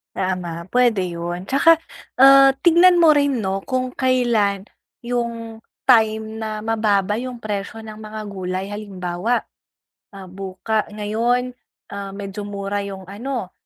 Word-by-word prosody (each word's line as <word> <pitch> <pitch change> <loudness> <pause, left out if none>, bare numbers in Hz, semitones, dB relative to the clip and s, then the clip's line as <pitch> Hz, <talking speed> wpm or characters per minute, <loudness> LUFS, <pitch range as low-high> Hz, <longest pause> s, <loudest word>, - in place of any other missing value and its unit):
Tama, 175 -3 -3
puwede 230 -4 +2
'yun, 175 +2 -5
tsaka, 320 +4 +5 0.4
ah, 275 0 +8
tingnan 345 +2 +5
mo 315 -3 +6
rin 285 -3 +2
'no 195 -1 -2
kung 255 -1 -2
kailan 230 -6 +1 0.3
'yung 235 -2 -4 0.2
time 220 -2 +3
na 220 -1 -4
mababa 210 -2 +1
'yung 250 +1 -5
presyo 210 0 -5
ng 220 -1 -9
mga 215 0 -8
gulay 185 -1 -4
halimbawa, 200 +1 -2 0.8
ah, 195 - -9
buka 195 +3 -3
ngayon, 235 +4 0 0.4
ah, 200 -1 -5
medyo 200 0 -6
mura 200 0 -3
'yung 195 -1 -7
ano 210 +1 -5
215 Hz, 125 wpm, -21 LUFS, 195-245 Hz, 0.8 s, ah